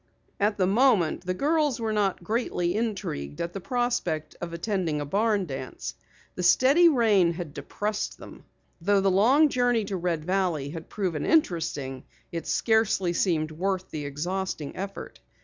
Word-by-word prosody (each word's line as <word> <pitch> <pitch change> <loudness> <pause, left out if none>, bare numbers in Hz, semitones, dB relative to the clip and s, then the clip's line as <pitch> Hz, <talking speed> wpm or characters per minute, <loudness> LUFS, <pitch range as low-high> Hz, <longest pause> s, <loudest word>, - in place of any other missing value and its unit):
At 205 +1 +1
the 185 - +3
moment, 195 -5 +2
the 185 - 0
girls 295 - +1
were 220 -1 -1
not 200 -4 0
greatly 180 -4 -1
intrigued 190 - -3
at 170 0 -3
the 195 - -5
prospect 235 - -1
of 175 -1 -4
attending 170 -3 -1
a 145 - -3
barn 205 +4 +1
dance. 135 -4 -6 0.4
The - - -5
steady 275 - +6
rain 210 - +3
had 170 -4 -6
depressed 210 +5 -3
them. - - -12 0.4
Though 200 +3 +3
the 195 0 +3
long 260 +11 +5
journey 245 -4 +1
to 195 -1 -3
Red 170 -3 -2
Valley 180 -6 0
had 165 +1 -8
proven 180 -8 -2
interesting, 160 - 0 0.3
it 165 -2 -5
scarcely 220 -5 +2
seemed 160 -4 0
worth 185 +3 -2
the 150 -2 -4
exhausting 160 +1 -3
effort. 195 +1 -7
190 Hz, 155 wpm, -26 LUFS, 165-220 Hz, 0.4 s, steady